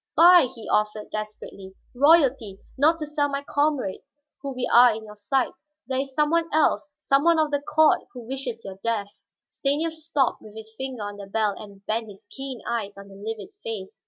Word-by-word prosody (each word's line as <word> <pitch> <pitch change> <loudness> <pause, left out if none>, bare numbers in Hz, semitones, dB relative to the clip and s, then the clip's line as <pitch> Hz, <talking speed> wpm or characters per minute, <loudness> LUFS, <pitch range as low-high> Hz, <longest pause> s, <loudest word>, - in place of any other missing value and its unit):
"Buy," 350 -3 +8
he 225 - -10
offered 210 0 0
desperately. 210 -2 -7 0.2
"Royalty, 265 - +4 0.2
not 310 +5 +4
to 310 - -4
sell 295 -1 0
my 280 0 -3
comrades 285 -9 -1 0.3
who 275 -2 -5 0.2
are 245 0 +8
we - - -5
in 220 - -10
your 210 0 -11
sight 240 +5 0 0.3
there 260 +1 -2
is 270 -1 -4
some 300 0 +2
one 335 0 +1
else, 300 -1 +2
some 275 -2 +2
one 335 0 +4
of 310 -1 +1
the 285 -1 0
court 305 +1 +3
who 245 -3 -10
wishes 255 -3 -5
your 190 -1 -8
death." 215 -3 -1 0.4
Stanief 300 +4 -1
stopped 315 -3 -1
with 215 0 -14
his 220 0 -10
finger 260 -3 -5
on 205 0 -6
the 200 -1 -9
bell 210 0 0
and 200 -1 -12
bent 225 +1 -1
his 200 +1 -14
keen 270 -3 -7
eyes 210 -4 -3
on 200 0 -11
the - - -13
livid 210 0 -6
face. 200 -4 -6
250 Hz, 200 wpm, -25 LUFS, 210-290 Hz, 0.4 s, Buy